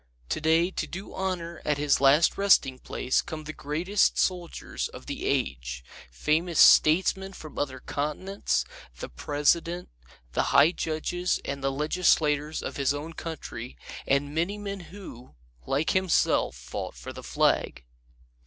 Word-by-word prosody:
Today 160 +3 +2
to - - -3
do 190 +3 -8
honor 175 -3 -3
at 150 -1 0
his 145 -1 +2
last 140 +4 +5
resting 190 -10 +3
place 130 - 0
come 155 -1 -7
the 155 +1 -7
greatest 170 +9 +1
soldiers 180 -2 -2
of - - -12
the - - -4
age, 60 -2 -2 0.3
famous 155 - 0
statesmen 190 +4 +5
from 155 -5 -9
other 135 -2 -2
continents, 150 - -2 0.3
the - - -6
President, 160 - 0 0.4
the - - 0
high 145 +4 +7
judges 175 +2 -1
and 140 0 -4
the 135 - +1
legislators 150 0 +1
of - - -5
his 140 0 +1
own 155 +3 -6
country, 140 -7 -7 0.3
and 140 +1 +1
many 170 +6 -1
men 200 -1 -5
who, 175 -11 -11 0.3
like 145 +4 +1
himself, 185 - +2
fought - - -6
for - - -8
the - - -9
flag. - - 0
155 Hz, 140 wpm, -27 LUFS, 140-175 Hz, 0.4 s, high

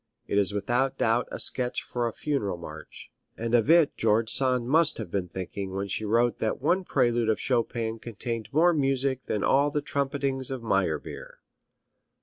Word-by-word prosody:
It 100 - +1
is 100 0 +2
without 120 +6 0
doubt 115 +2 +1
a - - -5
sketch 125 -1 -1
for 120 -1 -2
a - - -2
funeral 110 -10 -2
march, 80 -2 -11 0.3
and 115 +1 -3
of 120 +3 +3
it 165 -2 +5
George 110 0 +2
Sand 125 -3 +2
must 160 +3 +4
have 105 -7 -6
been 95 -3 -2
thinking 95 +2 -6
when 100 +1 -2
she 110 +2 -3
wrote 115 +3 +1
that 110 - -1
one 175 +7 +1
prelude 120 -7 +1
of 110 - +1
Chopin 115 -2 -1
contained 115 -1 -5
more 170 +4 +4
music 135 -3 0
than 105 - -2
all 140 +2 +3
the 145 0 -2
trumpetings 140 -2 -2
of 130 -3 -5
Meyerbeer. 95 -8 -2
120 Hz, 175 wpm, -27 LUFS, 105-135 Hz, 0.3 s, it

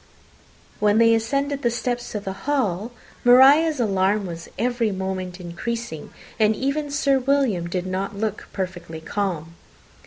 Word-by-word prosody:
When 210 0 +3
they 230 0 +6
ascended 275 +5 0
the 240 - +2
steps 240 +1 -3
to 210 - -2
the 195 -1 -5 0.2
hall, 225 -6 0 0.3
Maria's 275 +5 +6
alarm 200 -2 +1
was 170 -2 -7
every 240 -1 0
moment 190 -1 -4
increasing, 180 0 -5 0.3
and 215 0 +4
even 285 +4 -1
Sir 280 -1 +2
William 250 -10 +1
did 180 0 -2
not 190 +2 -3
look 215 0 -3
perfectly 180 -4 -5
calm. 165 -2 -3
215 Hz, 135 wpm, -23 LUFS, 185-250 Hz, 0.3 s, they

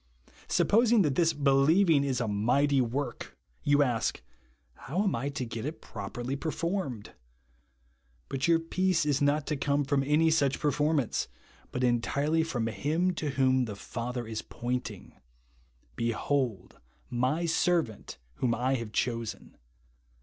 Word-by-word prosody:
Supposing 230 -1 +4
that 150 -4 +1
this 165 +3 +3
believing 145 +3 +4
is 135 -3 0
a 120 - -1
mighty 130 +7 +2
w^ork, 125 +1 -3 0.3
you 145 0 +4
ask, 120 -5 -1 0.3
" 65 -1 -38
How 175 +10 0
am 200 - +1
I 130 +5 -2
to 140 -3 -4
get 115 -1 -5
it 150 +4 -5
properly 120 +5 -5
performed 160 - -3 0.6
?" - - -39
But 135 +2 -1
your 165 -1 +5
peace 180 +1 0
is 145 -2 +1
not 145 +1 +2
to 150 - -1
come 140 +1 0
from 140 0 +1
any 155 +3 +3
such 140 -4 +2
performance, 150 -3 +1 0.4
but 125 - -2
entirely 140 +6 +1
from 130 -8 -2
Him 150 - 0
to 155 -3 -3
whom 130 -1 +2
the 105 -3 -6
Father 120 +4 -5
is 110 -1 -4
pointing, 125 +1 -5 0.4
" - - -34 0.3
Behold 115 -3 -1 0.3
my 130 +8 0
servant 160 - 0 0.2
whom 120 -2 +1
I 125 +3 0
have 115 -3 -6
chosen." 115 -3 -3
135 Hz, 145 wpm, -29 LUFS, 115-155 Hz, 0.6 s, your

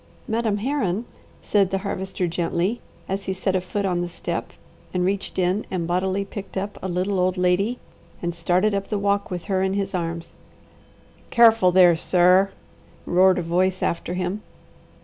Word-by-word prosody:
"'Madam 220 -2 0
Herron,'" 230 -3 -1 0.4
said 200 -3 +2
the 195 - 0
Harvester 190 -1 -3
gently, 175 +6 -1 0.3
as 195 0 -3
he 190 - -1
set 190 0 -1
a 185 - +1
foot 200 +3 -3
on 180 -2 0
the 175 - -3
step, - - -4 0.4
reached 190 +2 -1
in 185 +3 +1
and 180 -3 -2
bodily 185 +3 0
picked 195 0 -8
up 200 +2 -4
a 190 - -3
little 185 +2 -1
old 185 +1 +1
lady 180 +6 +1 0.4
and 175 0 -3
started 180 +5 +1
up 200 0 -2
the 210 - -1
walk 200 0 0
with 180 -2 -4
her 190 -1 0
in 190 0 0
his 200 0 -2
arms. 170 -1 -4 1.0
"Careful 225 -6 +6
there, 180 -2 +6
sir!" 180 +3 +4 0.6
roared 185 +1 +4
a 180 - -1
voice 185 +3 +1
after 170 +1 -1
him. 185 +3 -2
185 Hz, 170 wpm, -23 LUFS, 180-200 Hz, 1.0 s, Careful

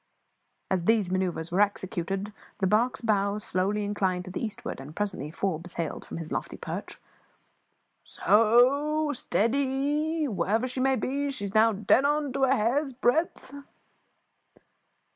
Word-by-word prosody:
As 185 -3 0
these 215 -4 +2
manoeuvres 180 -3 -1
were 185 +4 +2
executed, 195 0 -1 0.2
the 195 - 0
barque's 235 +7 +2
bows 205 -2 0
slowly 200 +3 0
inclined 190 -3 -1
to 185 - -8
the 190 - -4
eastward, 215 - -5
and 140 +3 -10
presently 195 -9 -3
Forbes 170 0 -3
hailed 170 - -4
from - - -7
his 165 -2 -7
lofty - - -3
perch - - -6 1.0
"S - - -16
o, 280 +8 +4
stead 230 -2 0
y! 290 +4 0
Whatever 215 +3 0
she 255 +1 -5
may 265 +1 +3
be, 280 +4 -1
she 265 -7 -5
is 195 - -6
now 225 +1 +5
dead 215 +5 +3
on 295 +1 +2
end 270 - -5
to 270 0 +2
a 265 +1 +3
hair's 265 +5 0
breadth." 265 +4 0
215 Hz, 155 wpm, -27 LUFS, 190-270 Hz, 1.0 s, now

